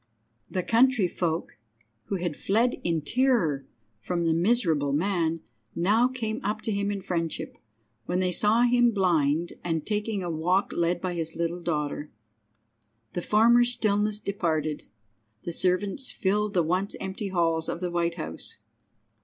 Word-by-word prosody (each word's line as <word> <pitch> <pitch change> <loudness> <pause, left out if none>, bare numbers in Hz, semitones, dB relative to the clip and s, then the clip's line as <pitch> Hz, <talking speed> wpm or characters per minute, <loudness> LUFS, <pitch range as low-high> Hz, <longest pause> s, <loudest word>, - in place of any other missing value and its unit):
The 185 - -2
country 235 -2 +4
folk, 165 - -3 0.5
who 200 - -2
had 175 -4 -2
fled 230 +5 +1
in 165 -2 0
terror 190 - +1 0.3
from 170 +9 -2
the 165 - +3
miserable 165 - +2
man, 165 -1 0 0.3
now 210 +8 +3
came 230 -4 -4
up 210 +2 -2
to 220 - -1
him 200 0 0
in 200 -1 -3
friendship, 170 -3 -3 0.5
when 175 - 0
they 185 -1 +1
saw 215 +6 +3
him 245 0 +4
blind 170 -4 +1
and 165 -3 -2
taking 210 -2 -1
a 175 - -3
walk 180 +5 +1
led 170 0 0
by 185 -1 -2
his 165 -1 -3
little 170 +1 -2
daughter. 150 -3 -2 1.0
The 175 - -2
former 230 +5 +5
stillness 215 -3 +1
departed. 160 -7 -2 0.6
The 170 - -4
servants 190 +8 +1
filled 210 +1 0
the 175 - +4
once 185 +5 -1
empty 195 +2 -4
halls 165 -3 +1
of - - -3
the 180 -1 -3
White 170 -1 0
House. 160 - -6
180 Hz, 150 wpm, -27 LUFS, 165-210 Hz, 1.0 s, former